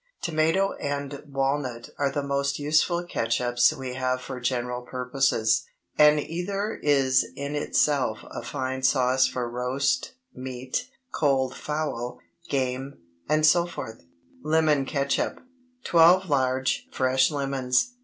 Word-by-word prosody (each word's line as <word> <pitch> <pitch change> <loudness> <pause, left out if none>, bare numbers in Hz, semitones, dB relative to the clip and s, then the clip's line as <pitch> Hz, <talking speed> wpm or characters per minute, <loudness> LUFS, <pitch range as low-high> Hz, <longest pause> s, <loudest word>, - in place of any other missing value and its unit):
Tomato 165 +4 +1
and 140 0 -3
walnut 135 -3 -2
are 140 -1 +2
the 145 +1 -2
most 140 0 -1
useful 155 +4 +1
catsups 120 -4 +2
we 130 -4 -6
have 130 0 -1
for 130 0 -7
general 125 0 -2
purposes, 125 -3 +1 0.3
and 150 0 +6
either 195 +7 -3
is 135 -3 +3
in 140 +1 -4
itself 145 -5 +1
a - - -5
fine 130 -1 -4
sauce 130 0 +3
for 125 -2 -3
roast 130 - -1 0.2
meat, 130 - -5 0.2
cold 135 -3 +1
fowl, 140 -5 -3 0.3
game, 135 0 -2 0.3
etc. 155 -5 +2 0.4
LEMON 155 -3 +2
CATSUP. 140 0 -1 0.4
12 175 +3 +5
large, 130 -1 +1
fresh 130 0 +2
lemons. 135 - 0
135 Hz, 115 wpm, -26 LUFS, 130-150 Hz, 0.4 s, and